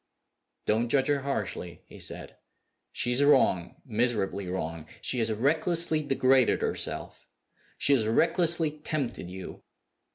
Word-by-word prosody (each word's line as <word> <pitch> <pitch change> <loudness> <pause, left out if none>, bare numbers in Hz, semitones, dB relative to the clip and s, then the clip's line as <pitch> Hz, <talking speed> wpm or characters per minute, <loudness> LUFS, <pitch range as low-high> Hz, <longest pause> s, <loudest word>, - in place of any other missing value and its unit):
"Don't 115 +2 +1
judge 135 +2 +2
her 145 -1 +2
harshly," 105 -10 -4
he - - -14
said. - - -4 0.6
"She 120 - -1
is 125 +3 +3
wrong, 130 -12 +3
miserably 110 -5 -1
wrong. 85 -3 -4
She 125 - -1
has 115 -1 +1
recklessly 155 +7 +2
degraded 135 -3 +2
herself; - - -4 0.5
she 140 - +3
has 115 -5 +2
recklessly 165 +5 +2
tempted 145 - -3
you. 95 0 -9
130 Hz, 125 wpm, -28 LUFS, 105-145 Hz, 0.6 s, is